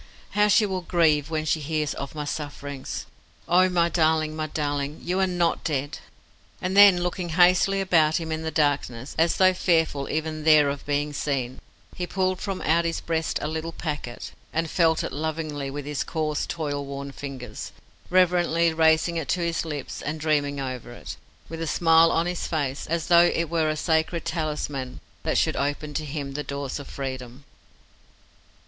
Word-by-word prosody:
How 210 0 +3
she 210 +1 +5
will 190 -2 -2
grieve 160 -4 +2
when 155 -1 -2
she 155 - +1
hears 155 0 -1
of 140 +3 -7
my 150 -1 -3
sufferings. 145 -2 -5 0.4
Oh! 185 +2 +5
my 170 -2 +2
darling, 160 -2 +1
my 155 0 -2
darling, 145 -1 -2
you 180 +2 -1
are 190 - +3
not 175 -2 0
dead!" 145 -2 -2 0.6
And 185 +1 -2
then, 200 -3 +8
looking 180 0 -3
hastily 185 +2 +5
about 165 -4 +3
him 165 -1 -5
in 160 0 -2
the 160 - -2
darkness, 145 -5 -1
as 165 +1 +3
though 185 0 +5
fearful 160 -6 +1
even 155 0 -2
there 155 -2 +6
of 140 0 -5
being 145 0 0
seen, 130 -3 -2 0.4
he 180 - -3
pulled 185 0 -1
from 195 -2 -3
out 165 +2 +3
his 165 0 -1
breast 160 -1 -1
a - - -1
little 160 +1 -4
packet, 145 -8 -5 0.2
and 165 0 -1
felt 165 -3 +3
it - - -3
lovingly 155 -2 -3
with 145 +1 -6
his 145 -1 -2
coarse, 155 -2 -2
toil 145 -3 -3
worn 140 0 -6
fingers, 130 -6 -7 0.4
reverently 175 -2 +3
raising 160 +1 +3
it 160 - -3
to 180 - +1
his 170 -1 -1
lips, 150 -4 -5
and 155 +2 -4
dreaming 145 -2 0
over 130 -3 -5
it, - - -8 0.3
with 165 0 -7
a 165 - -2
smile 165 0 +5
on 165 - +1
his 175 0 -3
face, 140 -4 -2
as 165 0 -1
though 175 0 +6
it 165 -1 -1
were 160 -2 +2
a 155 - -1
sacred 160 +1 0
talisman 150 -5 -3 0.2
that - - 0
should - - +2
open 145 +1 -2
to 155 - -2
him 140 -1 -5
the 150 - -3
doors 140 0 -4
of 140 - -9
freedom. 130 -1 -6
155 Hz, 180 wpm, -25 LUFS, 145-170 Hz, 0.6 s, then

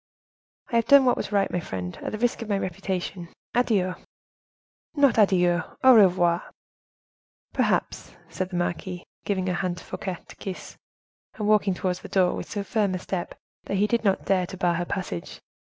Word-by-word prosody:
"I 235 - +3
have 230 0 +1
done 280 -1 +7
what 250 - +4
was - - -4
right, 200 -1 +2
my 180 - 0
friend, 90 - -5
at - - -4
the 215 - -3
risk 240 +1 0
of 225 - -6
my 200 - +2
reputation. 185 -1 -4 0.2
Adieu!" 205 -7 +2 1.0
"Not 280 -6 +4
adieu, 180 -4 +4 0.2
au 260 0 +9
revoir!" 180 -5 +5 1.1
"Perhaps," - - -1
said 185 -1 -4
the 185 - -6
marquise, 175 +1 -3 0.2
giving 190 -2 0
her 185 - 0
hand 175 0 -2
to - - -10
Fouquet 185 -3 -5
to - - -13
kiss, 190 -2 -7 0.6
and 210 -3 -3
walking 210 -3 +3
towards 180 0 -2
the - - -10
door 185 -2 +3
with - - -6
so 205 -2 -3
firm 200 -3 0
a - - -1
step, 180 -1 -4 0.3
that - - -2
he 205 - +3
did 235 +2 0
not 195 -3 +1
dare 185 -2 +2
to 190 - -8
bar 175 -2 +2
her 175 +1 -1
passage. 175 - -5
190 Hz, 185 wpm, -25 LUFS, 180-210 Hz, 1.1 s, au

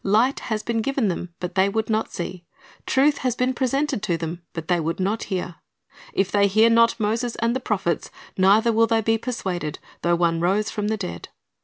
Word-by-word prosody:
Light 225 +7 +3
has 215 -2 -3
been 230 -1 -1
given 265 -3 0
them, 180 0 -4
but 180 -1 -4
they 190 +1 +3
would 220 +2 -1
not 220 0 -1
see; 175 0 -5 0.4
truth 280 +2 +3
has 255 -2 0
been 250 +1 +1
presented 270 -1 0
to 180 -6 0
them, 165 +1 -5
but 165 -1 -6
they 175 -1 +2
would 165 +2 -2
not 200 +4 -1
hear. 180 -3 -4 0.5
"If 195 0 0
they 200 -1 +4
hear 220 +4 +4
not 230 +1 +4
Moses 225 +3 -1
and 230 +2 0
the - - 0
prophets, 195 -8 -1 0.3
neither 205 +5 +4
will 225 +1 +4
they 225 0 +2
be 225 +1 +1
persuaded, 185 - -3 0.2
though 175 0 +2
one 170 -1 +1
rose 195 +5 +1
from 210 -1 -2
the 220 0 0
dead." 85 - -6
210 Hz, 205 wpm, -23 LUFS, 180-230 Hz, 0.5 s, they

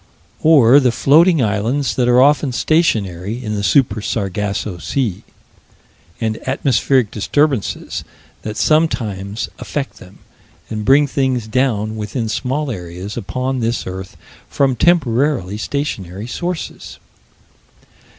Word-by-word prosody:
Or 140 -5 +6
the 130 -3 +2
floating 160 +4 +4
islands 115 +7 0
that 125 -2 +1
are 125 0 +5
often 145 -1 +3
stationary 115 - 0
in 105 - -2
the 105 - -2
Super 120 0 +2
Sargasso 100 -2 -3
Sea; 95 - -2 1.0
and 110 -1 -2
atmospheric 130 -3 +1
disturbances 135 +2 -1 0.4
that 105 0 -6
sometimes 110 -11 0
affect 140 -2 -4
them, 95 +1 -15 0.5
and 110 -1 -3
bring 140 +2 +5
things 130 -4 -1
down 110 -3 0
within 110 +2 -3
small 130 +5 -2
areas, 90 0 -7
upon 130 +5 -3
this 115 0 -1
earth, 95 0 -7 0.3
from 135 -2 +1
temporarily 125 - +1
stationary 105 - -4
sources. 175 +7 -5
120 Hz, 110 wpm, -18 LUFS, 105-140 Hz, 1.0 s, Or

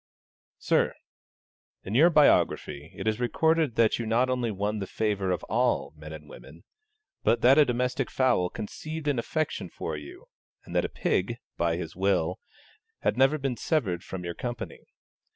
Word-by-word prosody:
Sir, - - +1 0.9
In 95 - -5
your 155 +9 +6
biography 80 - +3
it - - -5
is 110 +1 +1
recorded 160 +2 +2
that 115 0 +3
you 115 - -3
not 120 +3 +2
only 125 -2 0
won 105 +1 -2
the 95 - -4
favour 100 -3 -1
of 90 -3 -1
all - - 0
men 75 +1 -10
and 75 -1 -9
women; 75 +5 -13 0.6
but 115 - +2
that 135 +5 +6
a 150 - +7
domestic 125 +1 -1
fowl 125 -9 +2
conceived 155 - -6
an 140 -4 +1
affection 150 - -2
for 80 - -5
you, 75 -1 -10 0.4
and - - -9
that - - +2
a - - -3
pig, 115 +6 -1 0.2
by 85 -1 +1
his 85 -2 -6
will, 95 -3 +1 0.6
had - - +1
never 135 +4 +4
been 135 -3 -2
severed 100 - 0
from 95 -1 -6
your 85 0 -4
company. 120 +5 -5
115 Hz, 170 wpm, -27 LUFS, 90-130 Hz, 0.9 s, a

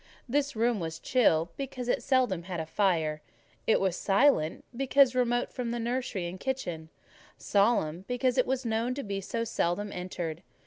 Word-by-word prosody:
This 285 +2 0
room 230 0 +1
was 160 -2 -4
chill, 170 -7 +2
because 260 -3 -5
it - - +1
seldom 250 -11 +1
had 180 -2 -4
a 160 - -3
fire; 160 -4 +1 0.5
it 220 - +4
was 190 -3 +1
silent, 195 - +2
because 270 0 +4
remote 245 -1 +1
from 245 -2 -3
the 240 - -2
nursery 235 -5 -2
and 175 +2 -6
kitchen; 175 -12 -3 0.5
solemn, 195 -5 +1
because 250 +1 +1
it 255 - +3
was 260 0 -1
known 230 +2 0
to 280 - -4
be 200 -1 -3
so 230 +4 -2
seldom 205 -1 -1
entered. 175 -3 -5
220 Hz, 170 wpm, -29 LUFS, 175-250 Hz, 0.5 s, it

